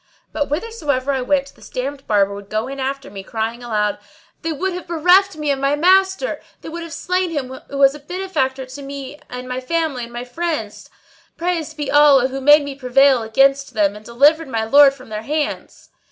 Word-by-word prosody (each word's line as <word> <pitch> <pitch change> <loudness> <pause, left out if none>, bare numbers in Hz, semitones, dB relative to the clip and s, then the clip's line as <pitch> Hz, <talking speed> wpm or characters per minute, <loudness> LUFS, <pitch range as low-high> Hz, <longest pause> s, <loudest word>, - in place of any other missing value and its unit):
But 290 - -1
whithersoever 295 - -2
I 265 -2 -1
went 275 +2 0
this - - -15
damned 275 +2 -5
Barber 200 -2 +2
would 200 0 -10
go 215 +3 -2
in 275 +1 -7
after 270 +1 -4
me, 195 - -7
crying 225 +4 -4
aloud, 210 -4 -1 0.4
"They 325 - -2
would 370 +5 -2
have 360 -1 -7
bereft 360 +4 +4
me 300 -1 -1
of 275 - -1
my 275 +1 +1
maa 365 +5 +6
a - - -6
ster! 385 +6 -5 0.2
They - - -8
would 340 +1 -6
have 335 -1 -8
slain 365 +2 -1
him 290 -6 -3 0.2
who 280 - -5
was 275 0 +5
a 295 - -10
benefactor 285 -6 -2
to 260 +2 -10
me 275 +1 -8
and 250 0 -7
my 255 0 -3
family 305 -3 -1
and 235 - -14
my 240 0 -5
friends! 250 -5 -4 0.5
Praised 330 -3 -2
be 295 -2 -3
Allah 285 -3 +6
who 270 +1 -5
made 295 +2 +6
me 285 -1 -5
prevail 270 0 +3
against 270 +5 +2
them 205 -1 +2
and 210 - -11
delivered 285 +8 +3
my 225 -4 -2
lord 275 +4 +6
from 255 -3 -15
their 215 0 -4
hands!" 300 +6 -4
275 Hz, 210 wpm, -19 LUFS, 250-315 Hz, 0.5 s, maa